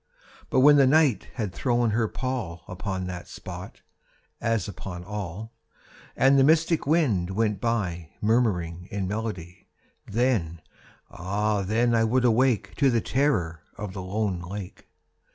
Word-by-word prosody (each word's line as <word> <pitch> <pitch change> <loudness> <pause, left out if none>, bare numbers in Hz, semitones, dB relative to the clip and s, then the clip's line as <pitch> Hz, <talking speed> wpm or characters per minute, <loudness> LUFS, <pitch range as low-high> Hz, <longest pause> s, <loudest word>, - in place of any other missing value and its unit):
But 130 - +3
when 145 +2 +7
the 135 -2 +6
Night 140 - +3
had 105 -7 -3
thrown 120 -1 +1
her 110 +1 +1
pall 120 -10 -4
Upon 95 0 -4
that 90 -1 -6
spot, - - -9 0.6
as 115 -4 0
upon 90 -2 -7
all, 105 +2 -6 0.6
And 135 +1 +5
the - - +6
mystic 160 +1 +3
wind 130 - +2
went 105 0 0
by 90 -9 -1
Murmuring 95 -7 0
in 100 -2 -3
melody— 95 -4 -5 0.4
Then—ah 100 -1 -2
then 115 +5 +1
I 115 -1 +3
would 125 +3 +2
awake 120 -1 +2
To 140 -2 +4
the 120 -2 +2
terror 105 - 0 0.2
of 105 -3 -6
the 95 - -5
lone 95 0 -2
lake. 95 +2 -8
105 Hz, 135 wpm, -26 LUFS, 90-120 Hz, 0.6 s, when